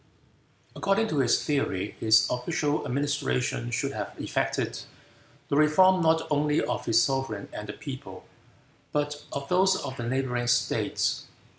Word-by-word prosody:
According 205 +3 +1
to 150 - 0
his 125 -3 +3
theory, 105 -9 -1
his 110 0 +5
official 145 +4 -1
administration 125 - -1
should - - -1
have - - -5
effected - - -2 0.7
the - - +1
reform 180 +5 +5
not 160 0 +3
only 150 0 +2
of - - -2
his 115 +1 +5
sovereign 135 -6 -2
and 105 0 -7
the - - -4
people, 135 -10 -8 0.7
but 145 0 -2
of 140 0 -4
those 190 +2 +3
of 130 -7 -5
the 120 - -4
neighboring 125 -2 -1
states. 125 0 0
140 Hz, 140 wpm, -27 LUFS, 120-150 Hz, 0.7 s, his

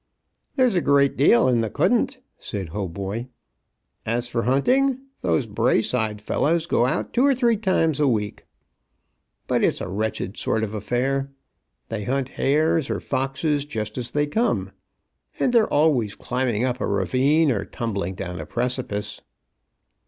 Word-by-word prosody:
"There 260 -2 +4
is 235 -6 +1
a 175 - +3
great 140 -1 +3
deal 130 -2 +5
in 120 -2 +3
the 110 - -1
couldn't," 235 - +1 0.2
said 95 -5 -5
Hautboy. 100 +5 -4 0.8
"As 120 +2 0
for 120 -1 -1
hunting, 250 - +2 0.2
those 135 - +1
Braeside 110 0 +1
fellows 165 +8 +1
go 120 -7 +2
out - - -2
two 245 - +3
or 280 -1 +4
three 240 -2 +3
times 185 -8 +1
a 145 - +3
week. 105 -5 -2 1.0
But - - 0
it's - - +2
a - - -4
wretched 100 0 -3
sort 110 - 0
of 110 -1 -3
affair. 130 +6 -1 0.6
They 105 -3 -4
hunt 135 0 -1
hares 155 +2 +1
or - - -1
foxes 140 +2 -1
just 110 -7 -5
as 120 -2 -1
they 145 +4 +1
come, 225 +11 0 0.7
and 250 - +1
they're 230 -2 +4
always 135 -9 +2
climbing 125 -2 -1
up 125 0 -2
a - - 0
ravine 130 - +2
or 100 -5 -1
tumbling 100 -5 -4
down 90 -2 -5
a 75 - -8
precipice." 120 - -2
125 Hz, 155 wpm, -23 LUFS, 110-150 Hz, 1.0 s, deal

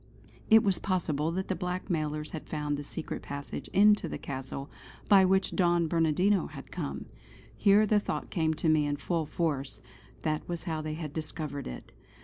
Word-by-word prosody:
It 220 0 +7
was 195 -3 +3
possible 160 -5 0
that 190 +1 -2
the - - 0
blackmailers 160 -4 -2
had 160 - -7
found 150 -1 -1
the 145 - -5
secret 150 - -5
passage 140 0 -6
into 205 -3 +4
the - - -4
Castle 135 0 -6 0.4
by 195 -2 +7
which 190 +1 +2
Don 175 -2 +3
Bernardino 170 +5 +2
had - - -11
come. - - -4 0.5
Here 205 +1 +5
the 210 0 +3
thought - - -4
came 160 -3 +1
to 160 - -1
me 155 -2 +4
in 145 - 0
full 165 0 -1
force; 145 -6 -2 0.4
that 155 +1 -2
was 175 -1 -3
how 160 -3 -2
they 155 0 -4
had 155 -3 -6
discovered 155 -2 -3
it. 60 - -8
160 Hz, 175 wpm, -29 LUFS, 150-185 Hz, 0.5 s, It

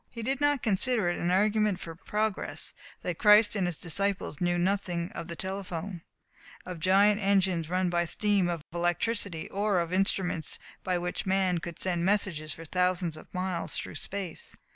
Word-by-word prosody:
He 230 -2 -7
did 270 +4 -1
not 290 -2 +2
consider 215 -1 +2
it 175 - -2
an 175 - 0
argument 210 +1 +2
for 165 - -7
progress 210 +5 -2 0.3
that 175 -2 -3
Christ 210 0 +6
and 190 -3 +1
His 175 -3 -1
disciples 185 -2 -1
knew 175 0 +2
nothing 175 -1 0
of 170 -6 -6
the 170 - -5
telephone, 190 -1 -5 0.6
of 180 -2 -6
giant 200 +4 +4
engines 190 -5 +2
run 185 +1 +1
by 175 0 +2
steam, 200 0 +1
of 170 -3 -3
electricity, 175 +1 0
or 200 -1 +1
of 170 +1 -2
instruments 185 -4 0 0.3
by 185 -1 0
which 175 +2 -3
man 185 -2 +2
could 170 0 -7
send 175 -2 0
messages 180 -6 0
for 165 - -10
thousands 180 -1 +1
of 155 - -13
miles 185 -2 -2
through - - -5
space. 190 -5 -6
185 Hz, 170 wpm, -29 LUFS, 175-200 Hz, 0.6 s, Christ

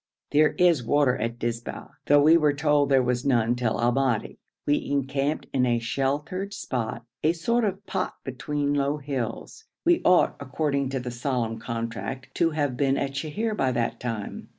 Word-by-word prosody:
There 150 +1 +4
is 175 -8 +3
water 135 +1 +3
at 115 +1 -3
Dizba, 120 0 -4 0.2
though 145 0 +6
we 160 +2 +7
were 150 -3 +4
told 145 -1 +2
there 135 -2 +4
was 125 0 0
none 120 -4 +2
till 120 -3 -1
Al 120 +1 +3
Madi. 130 -4 0 0.3
We 145 - +1
encamped 140 +1 -1
in 130 -2 +2
a 120 -1 +2
sheltered 145 - -2
spot, 120 - -4 0.2
a 160 - +3
sort 235 +8 0
of 200 0 -3
pot - - -2
between 145 +3 -2
low 140 +1 +1
hills. 135 - -5 0.2
We 345 0 +4
ought, 180 0 +4
according 140 0 -1
to 135 0 -2
the 125 0 -5
solemn 120 -2 -2
contract, 115 +3 -5
to 165 - +3
have 145 -5 -1
been 135 0 +1
at 140 -1 -1
Sheher 160 +11 -2
by 130 -8 +1
that 120 -1 -1
time. 115 -4 -5
135 Hz, 175 wpm, -26 LUFS, 120-150 Hz, 0.3 s, we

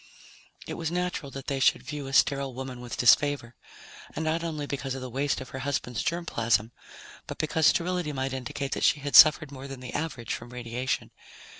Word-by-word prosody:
It - - -5
was 165 -1 -1
natural 180 -4 -2
that 135 -1 -8
they 140 -2 -2
should - - +3
view 145 -2 -6
a 135 - -7
sterile 140 -2 +2
woman 130 -1 -6
with 120 -1 -6
disfavor, 125 -1 +3 0.6
and 160 - -2
not 160 +1 0
only 155 -3 -3
because 140 -2 -4
of 135 - -6
the 130 -1 -6
waste 140 +3 0
of 130 - -8
her 130 - -6
husband's 130 -3 -2
germ 170 +1 -2
plasm, 115 -4 +1 0.6
but - - -6
because 155 0 +2
sterility 175 -2 +1
might 135 -1 -3
indicate 130 +1 -4
that - - -2
she 150 - +3
had 145 0 -2
suffered 155 -1 +8
more 135 0 -8
than 135 -2 -8
the 125 -1 -8
average 135 -8 -3
from 120 - -7
radiation. 125 +1 -3
135 Hz, 200 wpm, -27 LUFS, 125-150 Hz, 0.6 s, suffered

